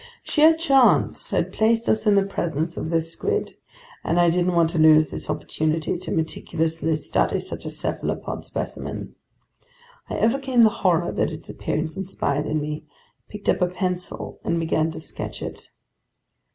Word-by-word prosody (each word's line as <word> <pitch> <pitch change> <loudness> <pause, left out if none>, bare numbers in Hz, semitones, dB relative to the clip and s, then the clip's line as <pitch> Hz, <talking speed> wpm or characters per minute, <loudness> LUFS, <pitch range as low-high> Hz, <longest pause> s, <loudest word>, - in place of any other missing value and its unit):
Sheer 315 +1 +5
chance 275 -6 +3
had - - -1
placed 225 +1 +2
us 220 0 +1
in 205 - +5
the 200 -1 +4
presence 170 -4 -2
of - - -4
this 165 0 0
squid, 425 +1 -2 0.5
and 170 +2 +1
I 175 -1 +5
didn't 175 +1 +1
want 165 -1 +3
to 170 - -1
lose 155 -1 +6
this - - -3
opportunity 155 +1 -1
to 175 - -6
meticulously 160 0 -1
study 155 - 0
such - - -5
a - - -2
cephalopod - - -3
specimen. - - -5 1.0
I - - -3
overcame 255 +1 +3
the 220 - +6
horror 175 -2 +2
that - - 0
its 155 +1 -8
appearance 155 +2 -3
inspired 150 -6 -2
in 155 - 0
me, 150 +1 -4 0.5
picked 210 -1 -9
up - - +2
a 180 - +4
pencil, 180 0 -3
and 170 0 0
began 160 -1 +1
to 160 - -6
sketch 160 - -6
it. - - -7
170 Hz, 165 wpm, -23 LUFS, 160-205 Hz, 1.0 s, lose